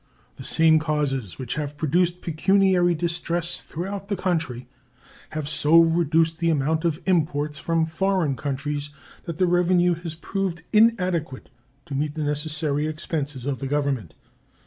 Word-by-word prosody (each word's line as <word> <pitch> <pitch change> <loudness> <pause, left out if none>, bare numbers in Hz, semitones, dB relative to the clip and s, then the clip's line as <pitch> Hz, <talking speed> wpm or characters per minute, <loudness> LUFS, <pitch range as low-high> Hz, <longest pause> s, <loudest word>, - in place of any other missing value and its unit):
The - - -8
same 160 +3 +4
causes 145 - -2
which 125 -2 -4
have 150 -1 -4
produced 175 +4 +1
pecuniary 180 +1 +3
distress 170 +1 -1
throughout 195 +4 -6
the 200 - -1
country 160 -10 -2 0.6
have 155 -2 -4
so 150 +2 +4
reduced 165 -1 +3
the 170 0 +1
amount 160 +2 +1
of 160 -1 0
imports 150 -5 0
from 165 -1 +1
foreign 170 -2 0
countries 145 +1 -3 0.4
that 170 -2 -5
the 185 - +3
revenue 180 0 +3
has 165 -1 -6
proved 175 0 -3
inadequate 185 - +2 0.3
to 145 - -8
meet 145 +2 -2
the 155 - -2
necessary 150 0 -1
expenses 150 -4 -4
of 140 -2 -2
the 135 - -4
Government. 140 - -1
160 Hz, 145 wpm, -24 LUFS, 145-175 Hz, 0.6 s, same